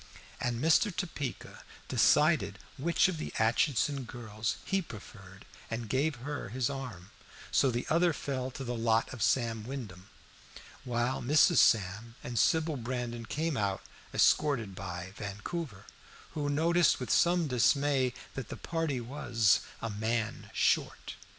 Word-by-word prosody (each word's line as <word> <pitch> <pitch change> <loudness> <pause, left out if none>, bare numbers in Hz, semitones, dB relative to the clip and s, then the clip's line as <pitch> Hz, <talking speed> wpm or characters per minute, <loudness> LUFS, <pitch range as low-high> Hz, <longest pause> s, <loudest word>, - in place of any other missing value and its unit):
And 120 -1 -1
Mr. 160 - +4
Topeka 155 -8 -5 0.2
decided - - +3 0.2
which 170 +7 +3
of 180 -4 -3
the - - -4
Aitchison 130 +4 +1
girls 110 -2 -4
he 195 -1 +1
preferred, 100 - -12 0.2
and 115 0 -4
gave 140 +6 +1
her 145 -6 -4
his 125 +3 -1
arm, 120 -10 -7 0.4
so 135 - +4
that 120 - -1
the 120 - -4
other 170 +1 +4
fell 130 -4 -3
to 135 +1 -7
the 125 -1 -3
lot 115 0 +1
of 125 - -8
Sam 115 +1 +1
Wyndham, 105 -7 -7 0.8
while 120 +1 -1
Mrs. 145 +5 +4
Sam 110 +2 +3
and 120 -2 -2
Sybil 160 -2 +2
Brandon 120 -1 -4
came 160 0 -1
out 100 -5 -1 0.3
escorted 125 -10 +2
by 90 0 -6
Vancouver, 105 - -5 0.5
who 145 -3 -2
noticed 165 +4 +3
with 125 - -3
some 175 -1 +4
dismay 130 +2 +2 0.2
that 135 -4 -6
the - - -6
party 165 -6 -2
was 120 -4 +2 0.2
"a 115 - -2
man 110 +2 -2
short." - - 0
125 Hz, 140 wpm, -31 LUFS, 110-145 Hz, 0.8 s, Mr